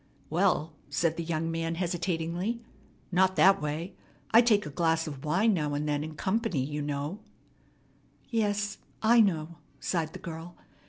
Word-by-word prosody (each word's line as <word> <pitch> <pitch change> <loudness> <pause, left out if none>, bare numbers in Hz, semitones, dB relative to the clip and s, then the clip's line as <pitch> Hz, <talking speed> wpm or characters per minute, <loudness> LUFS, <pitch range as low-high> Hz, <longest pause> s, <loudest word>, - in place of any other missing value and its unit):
"Well," 165 -2 +2 0.2
said 160 +3 +1
the 170 - -3
young 165 0 -1
man 165 0 -2
hesitatingly, 175 +4 -1 0.5
"not 190 +1 +3
that 195 +1 +6
way. 155 +5 -3 0.4
I 225 - +8
take 215 -5 +3
a 150 - -6
glass 165 +2 +1
of 140 -4 -7
wine 190 +9 +3
now 150 -5 -1
and 150 +1 -2
then 145 0 0
in 155 0 -7
company, 195 - 0
you 150 +1 -3
know 145 +6 -3 0.6
" - - -35 0.3
"Yes, 210 -2 0 0.2
I 230 +1 +7
know," 165 -4 -1 0.2
sighed 165 -3 -1
the - - -6
girl. 170 -1 -8
170 Hz, 160 wpm, -29 LUFS, 155-195 Hz, 0.6 s, I